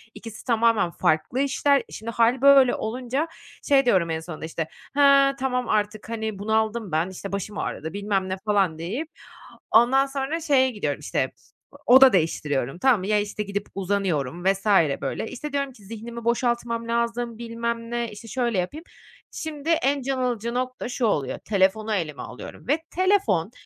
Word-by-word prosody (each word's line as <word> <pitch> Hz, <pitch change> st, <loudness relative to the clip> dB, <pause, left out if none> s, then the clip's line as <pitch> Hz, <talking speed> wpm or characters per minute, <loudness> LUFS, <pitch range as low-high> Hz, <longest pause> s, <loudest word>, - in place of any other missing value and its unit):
ikisi 225 Hz, -2 st, -10 dB
tamamen 230 Hz, -6 st, +2 dB
farklı 160 Hz, +14 st, 0 dB
işler. 280 Hz, 0 st, +2 dB
Şimdi 230 Hz, +2 st, -6 dB
hâl 235 Hz, +3 st, +2 dB
böyle 275 Hz, -3 st, +6 dB
olunca 255 Hz, +7 st, -2 dB, 0.4 s
şey 275 Hz, -3 st, +4 dB
diyorum 185 Hz, -8 st, +3 dB
en 160 Hz, 0 st, -1 dB
sonunda 160 Hz, -1 st, -7 dB
işte 160 Hz, 0 st, -4 dB, 0.3 s
"Ha, 275 Hz, -1 st, +5 dB
tamam 250 Hz, -2 st, -1 dB
artık 210 Hz, +1 st, -1 dB
hani 220 Hz, -3 st, -4 dB
bunaldım 220 Hz, -1 st, 0 dB
ben 160 Hz, +4 st, 0 dB
işte 195 Hz, +1 st, -7 dB
başım 200 Hz, +1 st, -4 dB
ağrıdı 160 Hz, +3 st, -4 dB
bilmem 200 Hz, -2 st, -1 dB
ne." 185 Hz, -, -2 dB
falan 195 Hz, -6 st, +2 dB
deyip 170 Hz, +2 st, -5 dB, 0.8 s
ondan 255 Hz, +4 st, +5 dB
sonra 275 Hz, +4 st, -3 dB
şeye 265 Hz, -4 st, +3 dB
gidiyorum 150 Hz, -, -3 dB
işte 130 Hz, -3 st, -1 dB, 0.5 s
oda 260 Hz, 0 st, +8 dB
değiştiriyorum, 150 Hz, -4 st, 0 dB
tamam 250 Hz, -4 st, +4 dB
mı? 190 Hz, -, -5 dB
Ya 210 Hz, -1 st, +3 dB
işte 210 Hz, +1 st, -3 dB
gidip 200 Hz, 0 st, -4 dB
uzanıyorum 180 Hz, -5 st, -1 dB
vs. 195 Hz, +1 st, +1 dB, 0.4 s
böyle. 140 Hz, +10 st, -3 dB
İşte 290 Hz, +3 st, -7 dB
diyorum 280 Hz, -1 st, -1 dB
ki 205 Hz, -5 st, -18 dB
"Zihnimi 230 Hz, +2 st, -8 dB
boşaltmam 235 Hz, -1 st, 0 dB
lazım, 235 Hz, 0 st, -1 dB
bilmem 230 Hz, 0 st, -4 dB
ne, 235 Hz, -2 st, -2 dB
işte 210 Hz, +2 st, -11 dB
şöyle 240 Hz, -4 st, -1 dB
yapayım." 295 Hz, -, -4 dB, 0.5 s
Şimdi 315 Hz, 0 st, -5 dB
en 285 Hz, -3 st, +2 dB
can 265 Hz, +1 st, -2 dB
alıcı 235 Hz, -2 st, -1 dB
nokta 255 Hz, 0 st, -3 dB
şu 245 Hz, -1 st, -1 dB
oluyor, 145 Hz, -11 st, 0 dB
telefonu 210 Hz, +2 st, +1 dB
elime 155 Hz, -8 st, -3 dB
alıyorum 125 Hz, -, -10 dB
ve 315 Hz, +4 st, +1 dB
telefon 370 Hz, -, +2 dB
230 Hz, 160 wpm, -24 LUFS, 195-255 Hz, 0.8 s, oda